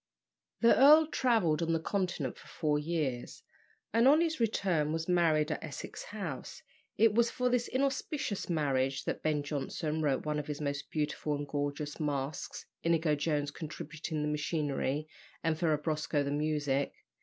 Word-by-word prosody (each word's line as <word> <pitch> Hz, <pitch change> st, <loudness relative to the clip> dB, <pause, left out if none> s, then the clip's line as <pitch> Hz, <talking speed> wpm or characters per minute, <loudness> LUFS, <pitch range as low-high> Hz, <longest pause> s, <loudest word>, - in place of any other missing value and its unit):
The 235 Hz, -, +6 dB
earl 305 Hz, +4 st, +8 dB
travelled 225 Hz, -, +2 dB
on 165 Hz, 0 st, +1 dB
the 165 Hz, -, +2 dB
Continent 175 Hz, -7 st, -2 dB
for -, -, -15 dB
four 150 Hz, -1 st, 0 dB
years, 150 Hz, -6 st, -3 dB, 0.5 s
and 230 Hz, +3 st, +5 dB
on 295 Hz, +3 st, +7 dB
his 325 Hz, -3 st, 0 dB
return 185 Hz, -9 st, +1 dB
was 165 Hz, 0 st, -2 dB
married 165 Hz, -4 st, +3 dB
at 150 Hz, -, -3 dB
Essex 145 Hz, -, -7 dB
House. 185 Hz, -11 st, -6 dB, 0.3 s
It 220 Hz, 0 st, +5 dB
was 235 Hz, +1 st, +3 dB
for 250 Hz, 0 st, 0 dB
this 245 Hz, -1 st, +1 dB
inauspicious 270 Hz, -5 st, -1 dB
marriage 135 Hz, -4 st, +1 dB
that -, -, -2 dB
Ben 150 Hz, -2 st, 0 dB
Jonson 150 Hz, +2 st, -2 dB
wrote 145 Hz, -2 st, 0 dB
one 150 Hz, 0 st, 0 dB
of 145 Hz, -, -5 dB
his 150 Hz, -1 st, -4 dB
most 140 Hz, -2 st, -3 dB
beautiful 150 Hz, -1 st, -1 dB
and 145 Hz, 0 st, -4 dB
gorgeous 145 Hz, 0 st, -3 dB
masques, 145 Hz, -1 st, -3 dB, 0.2 s
Inigo 165 Hz, -2 st, +2 dB
Jones 145 Hz, -1 st, 0 dB
contributing 155 Hz, 0 st, -5 dB
the -, -, 0 dB
machinery, 150 Hz, -1 st, -1 dB, 0.4 s
and 165 Hz, -1 st, +2 dB
Ferrabosco 155 Hz, -2 st, 0 dB
the 140 Hz, -, -2 dB
music. 145 Hz, -2 st, 0 dB
155 Hz, 155 wpm, -32 LUFS, 145-180 Hz, 0.5 s, earl